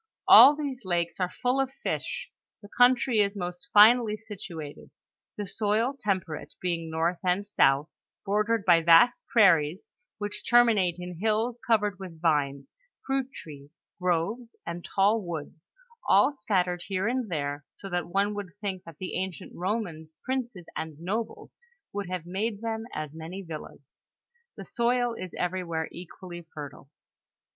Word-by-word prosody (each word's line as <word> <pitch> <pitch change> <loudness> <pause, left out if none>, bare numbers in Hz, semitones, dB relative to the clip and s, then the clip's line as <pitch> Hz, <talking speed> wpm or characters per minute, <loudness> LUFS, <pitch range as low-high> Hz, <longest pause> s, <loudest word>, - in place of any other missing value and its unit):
All 290 +2 +10
these 280 -4 -4
lakes 175 -2 -1
are 180 -1 0
full 250 +2 +3
of 270 - -1
fish; 485 -1 -3 0.3
the 205 - -12
country 245 -1 +4
is 200 0 +1
most 180 +8 -6
finely 215 +1 +6
situated, 180 -9 -9 0.5
the 205 - -3
soil 220 +6 0
temperate, 190 - -3
being 170 -2 -2
north 165 +2 0
and 185 +2 +1
south, 145 -7 +3 0.4
bordered 215 +1 +1
by 170 -2 +6
vast 170 +9 +6
prairies, 170 -6 +4 0.3
which 205 0 -5
terminate 225 -8 +4
in 180 -1 -7
hills 225 +3 0
covered 210 -4 +2
with 180 -4 -9
vines, 145 -4 +1 0.4
fruit 270 -1 -1
trees, 145 - -12 0.2
groves, 185 +7 -1
and 170 0 -5
tall 205 +3 +2
woods, 165 -2 -7 0.4
all 290 - +5
scattered 180 -7 0
here 195 +1 -1
and 245 -2 -1
there, 145 -3 -3
so 195 - -9
that 175 -3 -2
one 200 +3 +1
would 200 -4 -6
think 195 -3 -4
that 165 -3 -12
the 185 - -6
ancient 190 -3 -6
Bomans, 175 -5 -4
princes 245 -9 -3
and 160 -2 -5
nobles 215 +6 -5 0.3
would 200 -2 -4
have 180 -3 -4
made 200 +4 -3
them 225 -1 -3
as 155 -1 -5
many 165 +5 -7
villas. 155 -3 -9 0.7
The - - -8
soil 245 0 +1
is 185 -5 -7
everywhere 175 -3 -2
equally 175 0 -9
fertile. 140 -2 -9
190 Hz, 145 wpm, -27 LUFS, 170-225 Hz, 0.7 s, All